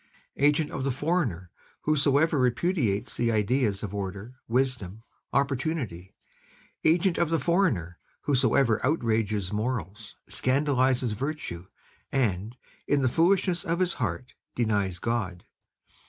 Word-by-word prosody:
Agent 150 Hz, +2 st, +2 dB
of -, -, -3 dB
the 135 Hz, -, 0 dB
foreigner 130 Hz, -, -1 dB, 0.3 s
whosoever 150 Hz, 0 st, +3 dB
repudiates 125 Hz, -, 0 dB
the 120 Hz, -1 st, +1 dB
ideas 110 Hz, -1 st, +1 dB
of 100 Hz, -2 st, -4 dB
order, 100 Hz, +3 st, -5 dB
wisdom, 115 Hz, -5 st, -1 dB, 0.3 s
opportunity; 135 Hz, -, -2 dB, 0.7 s
agent 170 Hz, +2 st, +3 dB
of 170 Hz, -, +2 dB
the 165 Hz, -, +2 dB
foreigner 130 Hz, -, +1 dB, 0.2 s
whosoever 130 Hz, -4 st, +2 dB
outrages 110 Hz, -, 0 dB
morals, 105 Hz, -3 st, -3 dB
scandalizes 130 Hz, -2 st, +1 dB
virtue, 105 Hz, -, -4 dB, 0.4 s
and, 115 Hz, -3 st, -1 dB, 0.3 s
in 145 Hz, -1 st, +2 dB
the -, -, +4 dB
foolishness 175 Hz, +4 st, +2 dB
of 170 Hz, +1 st, -1 dB
his 180 Hz, -1 st, +2 dB
heart, 110 Hz, +4 st, -3 dB, 0.2 s
denies 100 Hz, -6 st, 0 dB
God. 95 Hz, -5 st, -2 dB
125 Hz, 110 wpm, -27 LUFS, 105-150 Hz, 0.7 s, the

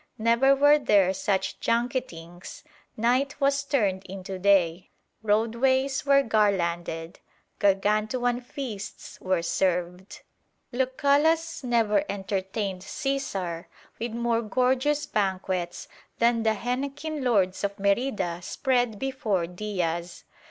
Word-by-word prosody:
Never 235 Hz, +5 st, +4 dB
were 290 Hz, +2 st, +5 dB
there 200 Hz, -8 st, +3 dB
such 190 Hz, 0 st, -1 dB
junketings: 190 Hz, -8 st, -3 dB, 0.3 s
night 250 Hz, +6 st, +1 dB
was 280 Hz, 0 st, +2 dB
turned 205 Hz, -10 st, 0 dB
into 190 Hz, 0 st, -7 dB
day; 185 Hz, -2 st, +2 dB, 0.3 s
roadways 255 Hz, +6 st, +1 dB
were 275 Hz, 0 st, +5 dB
garlanded; 175 Hz, -7 st, 0 dB, 0.4 s
gargantuan 215 Hz, +5 st, +1 dB
feasts 240 Hz, -5 st, -7 dB
were 185 Hz, -2 st, 0 dB
served. 180 Hz, +2 st, -2 dB, 0.5 s
Lucullus 285 Hz, +6 st, +1 dB
never 235 Hz, 0 st, +2 dB
entertained 195 Hz, 0 st, -3 dB
Caesar 195 Hz, -7 st, -3 dB, 0.3 s
with 235 Hz, -1 st, -3 dB
more 235 Hz, 0 st, 0 dB
gorgeous 260 Hz, +6 st, +1 dB
banquets 185 Hz, -3 st, -2 dB, 0.3 s
than 235 Hz, 0 st, +3 dB
the 220 Hz, -1 st, +2 dB
henequen 275 Hz, +6 st, -3 dB
lords 195 Hz, -7 st, +1 dB
of 200 Hz, 0 st, -2 dB
Merida 200 Hz, -4 st, 0 dB
spread 245 Hz, +2 st, 0 dB
before 220 Hz, -8 st, -1 dB
Diaz. 175 Hz, -2 st, -4 dB
215 Hz, 100 wpm, -26 LUFS, 190-260 Hz, 0.5 s, were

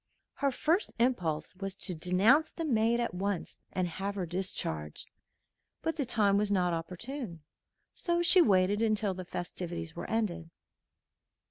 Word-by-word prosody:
Her 280 Hz, -, +1 dB
first 320 Hz, -, +1 dB
impulse 185 Hz, -11 st, 0 dB
was 195 Hz, 0 st, -4 dB
to 180 Hz, -, -4 dB
denounce 190 Hz, -, +4 dB
the 330 Hz, -, -4 dB
maid 230 Hz, -3 st, +2 dB
at 235 Hz, -5 st, -1 dB
once, 195 Hz, 0 st, -3 dB
and 185 Hz, -1 st, 0 dB
have 195 Hz, +4 st, -4 dB
her 190 Hz, -3 st, -2 dB
discharged; 160 Hz, -, -4 dB, 0.7 s
but 325 Hz, 0 st, 0 dB
the 290 Hz, -4 st, 0 dB
time 210 Hz, -4 st, +3 dB
was 205 Hz, 0 st, +1 dB
not 180 Hz, -3 st, +2 dB
opportune, 180 Hz, -, -5 dB, 0.5 s
so 345 Hz, -1 st, 0 dB
she 365 Hz, +1 st, +7 dB
waited 200 Hz, -, +3 dB
until 215 Hz, -3 st, +1 dB
the 185 Hz, 0 st, -7 dB
festivities 175 Hz, -2 st, -5 dB
were -, -, -6 dB
ended. 180 Hz, -7 st, -1 dB
195 Hz, 145 wpm, -31 LUFS, 175-235 Hz, 0.7 s, she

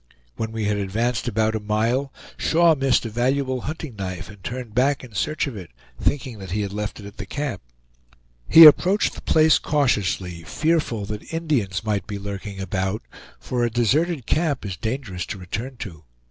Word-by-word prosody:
When 110 Hz, 0 st, -3 dB
we 110 Hz, -1 st, -3 dB
had 105 Hz, 0 st, +1 dB
advanced 110 Hz, +5 st, -1 dB
about 110 Hz, -1 st, +1 dB
a 110 Hz, -, -1 dB
mile, 115 Hz, +6 st, 0 dB, 0.2 s
Shaw 170 Hz, 0 st, +4 dB
missed 135 Hz, -5 st, +2 dB
a -, -, -3 dB
valuable 130 Hz, +2 st, 0 dB
hunting 155 Hz, -3 st, -6 dB
knife 90 Hz, -3 st, -5 dB
and 100 Hz, -2 st, -16 dB
turned 120 Hz, -1 st, -5 dB
back 135 Hz, +4 st, +2 dB
in 120 Hz, -3 st, -12 dB
search 155 Hz, +9 st, 0 dB
of 135 Hz, -5 st, -6 dB
it, 90 Hz, -5 st, -8 dB, 0.3 s
thinking 125 Hz, -6 st, -1 dB
that 95 Hz, -2 st, -8 dB
he 105 Hz, +4 st, -1 dB
had 100 Hz, -1 st, -3 dB
left 105 Hz, +1 st, -4 dB
it 100 Hz, -, -10 dB
at 100 Hz, +2 st, -11 dB
the 105 Hz, -, -5 dB
camp. 140 Hz, -7 st, -3 dB, 0.9 s
He 165 Hz, 0 st, +11 dB
approached 185 Hz, +7 st, +6 dB
the -, -, -9 dB
place 155 Hz, 0 st, +4 dB
cautiously, 100 Hz, -, 0 dB
fearful 145 Hz, -, 0 dB
that 105 Hz, +1 st, -7 dB
Indians 140 Hz, -, -1 dB
might 105 Hz, -3 st, -1 dB
be 105 Hz, -2 st, -4 dB
lurking 100 Hz, 0 st, -6 dB
about, 95 Hz, +2 st, -2 dB, 0.4 s
for 125 Hz, -1 st, -2 dB
a 120 Hz, -, +2 dB
deserted 130 Hz, -, +1 dB
camp 155 Hz, -7 st, 0 dB
is 95 Hz, -3 st, -4 dB
dangerous 110 Hz, -, -4 dB
to -, -, -5 dB
return 110 Hz, +8 st, -5 dB
to. 85 Hz, -9 st, -8 dB
115 Hz, 185 wpm, -23 LUFS, 100-140 Hz, 0.9 s, He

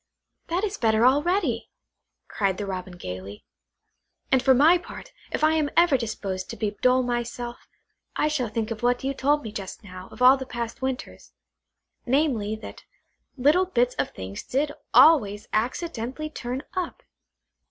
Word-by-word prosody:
"That 350 Hz, +4 st, -1 dB
is 415 Hz, -1 st, -2 dB
better 220 Hz, 0 st, +3 dB
already," 290 Hz, -, +2 dB, 0.6 s
cried 195 Hz, -3 st, -1 dB
the 205 Hz, -, -3 dB
Robin 185 Hz, -2 st, -6 dB
gaily; 95 Hz, -, -8 dB, 0.9 s
"and 265 Hz, -, +4 dB
for 265 Hz, 0 st, +5 dB
my 320 Hz, +7 st, +6 dB
part, -, -, -11 dB, 0.2 s
if -, -, -2 dB
I 310 Hz, +1 st, +5 dB
am 310 Hz, -2 st, +1 dB
ever 340 Hz, -4 st, +5 dB
disposed 200 Hz, -6 st, -3 dB
to -, -, -6 dB
be 215 Hz, -2 st, -1 dB
dull 255 Hz, 0 st, +4 dB
myself, 240 Hz, 0 st, -4 dB, 0.5 s
I -, -, +2 dB
shall 265 Hz, -7 st, -1 dB
think 220 Hz, +1 st, -3 dB
of 215 Hz, -, -4 dB
what 245 Hz, +1 st, +1 dB
you 270 Hz, +1 st, -1 dB
told 290 Hz, +2 st, +1 dB
me 220 Hz, -, -6 dB
just 200 Hz, +1 st, -7 dB
now 185 Hz, -1 st, -10 dB
of -, -, -13 dB
all 255 Hz, +2 st, +7 dB
the 265 Hz, -1 st, -7 dB
past 235 Hz, -1 st, -5 dB
winters; 260 Hz, -1 st, -5 dB, 0.7 s
namely, 245 Hz, -6 st, +1 dB
that 220 Hz, -, -10 dB, 0.5 s
little 300 Hz, +8 st, +4 dB
bits 250 Hz, -6 st, +1 dB
of -, -, +1 dB
things 95 Hz, +1 st, -7 dB
did 285 Hz, +3 st, -1 dB, 0.2 s
always 210 Hz, -11 st, +5 dB
accidentally 260 Hz, +4 st, -2 dB
turn 255 Hz, 0 st, -5 dB
up. 365 Hz, -3 st, -4 dB
245 Hz, 160 wpm, -25 LUFS, 215-290 Hz, 0.9 s, all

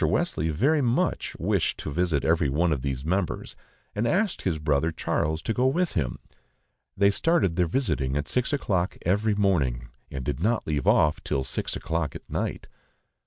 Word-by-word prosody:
Wesley 80 Hz, +2 st, +1 dB
very 140 Hz, -, +2 dB
much 120 Hz, -2 st, 0 dB
wished -, -, 0 dB
to 75 Hz, -, -5 dB
visit 85 Hz, -4 st, +1 dB
every 80 Hz, -3 st, +3 dB
one 80 Hz, +5 st, +2 dB
of 70 Hz, -, -3 dB
these 65 Hz, 0 st, -3 dB
members, 90 Hz, +2 st, -2 dB, 0.4 s
and 110 Hz, +3 st, 0 dB
asked 195 Hz, -, +1 dB
his 90 Hz, -4 st, 0 dB
brother 75 Hz, +1 st, +1 dB
Charles 80 Hz, 0 st, -1 dB
to 115 Hz, -, -1 dB
go 125 Hz, +3 st, +2 dB
with 175 Hz, +6 st, +1 dB
him. 65 Hz, -7 st, -1 dB, 0.8 s
They 100 Hz, 0 st, +5 dB
started 155 Hz, -, +2 dB
their 90 Hz, -1 st, +2 dB
visiting 70 Hz, -, 0 dB
at 75 Hz, -, -2 dB
six 125 Hz, -1 st, 0 dB
o'clock 95 Hz, -11 st, 0 dB
every 105 Hz, +4 st, +2 dB
morning, 70 Hz, -13 st, +1 dB, 0.2 s
and 65 Hz, -2 st, -5 dB
did -, -, -2 dB
not 110 Hz, +6 st, +1 dB
leave 75 Hz, -3 st, -1 dB
off 75 Hz, -1 st, +3 dB
till 65 Hz, -, -1 dB
six -, -, -2 dB
o'clock 80 Hz, -2 st, -2 dB
at -, -, -9 dB
night. -, -, -3 dB
85 Hz, 175 wpm, -26 LUFS, 75-110 Hz, 0.8 s, They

